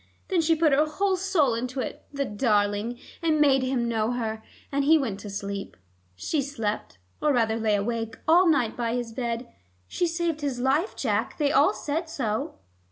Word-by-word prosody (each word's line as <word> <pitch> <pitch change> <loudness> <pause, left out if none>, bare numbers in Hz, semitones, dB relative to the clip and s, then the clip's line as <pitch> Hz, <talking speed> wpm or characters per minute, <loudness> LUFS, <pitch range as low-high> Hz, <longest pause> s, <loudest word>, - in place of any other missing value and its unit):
Then 365 -4 +3
she 325 0 +3
put 315 -2 +3
her 300 +3 +4
whole 380 +5 +1
soul 360 -9 +2
into 250 +3 -3
it, - - -5
the 280 -1 -2
darling, 205 0 0 0.2
and 320 -2 +2
made 275 -3 +5
him 255 -2 0
know 225 0 0
her, 220 -2 -3 0.3
and 280 0 +1
he 315 +3 +6
went 225 -9 -2
to 210 - -8
sleep. 200 - -5 0.4
She 290 - -1
slept, 225 - -4 0.2
or 300 - +3
rather 225 -4 +2
lay 220 -2 +2
awake, 225 +2 -2
all 350 +3 +6
night 250 -8 +2
by 235 -1 -1
his 240 -2 -3
bed. 235 0 -3 0.4
She 350 - 0
saved 335 -2 -1
his 275 -4 -2
life, 280 - +1
Jack; - - -1
they 290 -2 +2
all 285 0 +4
said 320 +3 -3
so." 225 -9 -2
260 Hz, 185 wpm, -26 LUFS, 225-305 Hz, 0.4 s, he